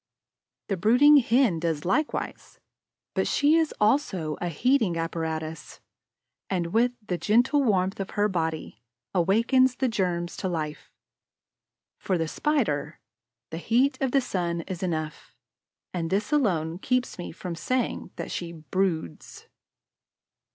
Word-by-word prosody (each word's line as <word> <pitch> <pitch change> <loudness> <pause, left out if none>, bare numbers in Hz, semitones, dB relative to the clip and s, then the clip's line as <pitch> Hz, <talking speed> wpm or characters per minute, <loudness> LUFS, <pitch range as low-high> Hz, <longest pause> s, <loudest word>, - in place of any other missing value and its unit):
The 195 - -1
brooding 250 - +6
Hen 235 -8 +3
does 160 -2 -2
likewise, 290 - -2 0.5
but - - 0
she 290 +2 +3
is 325 -2 +2
also 210 - +1
a 175 - -1
heating 215 - +1
apparatus 160 -2 -4 0.7
and, 175 -2 -2
with 240 +2 +3
the 180 -3 -2
gentle 245 +7 +3
warmth 195 -4 +1
of 195 - -3
her 205 0 +4
body, 160 - -3 0.3
awakens 230 +8 +3
the 260 +1 0
germs 175 -6 -1
to - - -2
life. 155 -3 -4 1.1
For 185 - 0
the 165 -1 -1
Spider, 255 - -1 0.5
the 160 - -4
heat 260 +7 +2
of 265 -2 +1
the 275 - +3
sun 170 -7 -2
is 180 0 -7
enough; 155 -4 -4 0.6
and 165 -2 -2
this 205 - -1
alone 175 - +1
keeps 250 -2 -1
me 175 - -5
from 180 +1 -6
saying 245 +10 -2
that - - -6
she 170 -1 -4
"broods." 160 - -3
185 Hz, 130 wpm, -26 LUFS, 165-245 Hz, 1.1 s, brooding